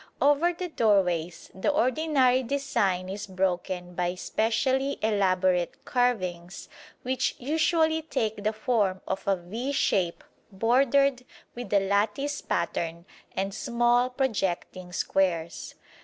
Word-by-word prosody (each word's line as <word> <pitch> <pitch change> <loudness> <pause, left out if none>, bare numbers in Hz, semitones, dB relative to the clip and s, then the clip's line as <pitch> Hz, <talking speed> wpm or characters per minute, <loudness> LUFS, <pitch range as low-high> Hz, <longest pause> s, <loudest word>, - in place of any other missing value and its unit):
Over 290 +5 +4
the 355 +1 -5
doorways 180 - +1
the 190 - -1
ordinary 265 -2 +2
design 230 -9 0
is 200 +2 -5
broken 185 -1 -2
by 175 0 -1
specially 260 +8 0
elaborate 185 -4 +1
carvings 185 -8 -1 0.3
which 260 +1 -1
usually 320 +3 +1
take 220 -9 -2
the 215 - +2
form 215 -4 0
of 190 +1 -4
a 195 - +4
V 215 +10 -5
shape 185 -10 0 0.3
bordered 255 +5 +2 0.3
with 245 0 -7
a 205 - +5
lattice 210 +9 0
pattern 170 0 -2 0.3
and 195 +1 -2
small 240 +2 +2
projecting 195 -8 -2
squares. 170 -3 -1
215 Hz, 110 wpm, -27 LUFS, 185-260 Hz, 0.3 s, a